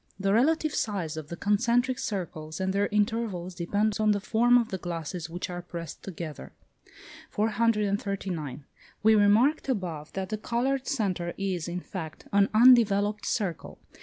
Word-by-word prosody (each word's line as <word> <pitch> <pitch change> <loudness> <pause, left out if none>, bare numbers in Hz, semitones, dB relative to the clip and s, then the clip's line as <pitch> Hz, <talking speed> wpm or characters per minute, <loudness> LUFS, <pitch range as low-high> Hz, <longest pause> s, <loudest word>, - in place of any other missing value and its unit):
The 195 0 +1
relative 310 +6 +2
size 185 -8 -2
of 155 -2 -6
the 170 - -6
concentric 240 +6 +1
circles 160 -6 -4
and 190 0 -1
their 200 +1 +2
intervals 210 -4 -1
depends 205 +5 0
on 215 -1 +4
the 205 - -1
form 240 +4 +4
of 235 -2 +1
the 190 - -4
glasses 170 0 -5
which 175 +2 -4
are 175 -1 -5
pressed 170 -2 -8
together. 160 - -7 0.8
439. 200 - -1 0.4
We 220 +1 +6
remarked 220 +9 +4
above, 170 - -3
that 190 -1 -4
the 215 - -3
coloured 255 +4 -1
centre 185 -9 -1
is, 185 -4 -2
in 175 +1 -4
fact, 160 -5 -8
an 200 0 +4
undeveloped 215 -3 +5
circle. 190 -8 -2
200 Hz, 150 wpm, -27 LUFS, 175-220 Hz, 0.8 s, We